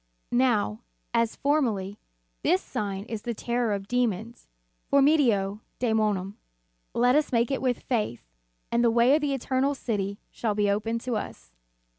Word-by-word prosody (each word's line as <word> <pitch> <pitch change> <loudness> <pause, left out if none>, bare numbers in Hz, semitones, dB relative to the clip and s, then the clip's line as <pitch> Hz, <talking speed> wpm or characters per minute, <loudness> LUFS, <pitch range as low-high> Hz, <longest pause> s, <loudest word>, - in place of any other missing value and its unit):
Now, 240 -3 +2 0.3
as 230 -1 +1
formerly, 225 -9 0 0.4
this 185 - +3
sign 200 -1 -4
is 225 -2 -5
the 235 0 -4
terror 235 0 -1
of 200 -1 -3
demons, 235 -1 -1 0.4
formido 255 -9 +3 0.2
dczmonum. 215 -5 0 0.6
Let 245 +2 +4
us 300 0 +2
make 235 +1 +2
it 270 - -1
with 255 -2 0
faith, 215 - -1 0.5
and 235 0 +2
the 235 - +5
way 235 +3 +4
to 300 - +4
the 290 -2 0
eternal 270 +2 0
City 200 -6 -3
shall 215 -3 -2
be 205 -1 +2
opened 225 +3 -1
to 245 -3 -1
us. 135 - -7
230 Hz, 150 wpm, -27 LUFS, 205-255 Hz, 0.6 s, the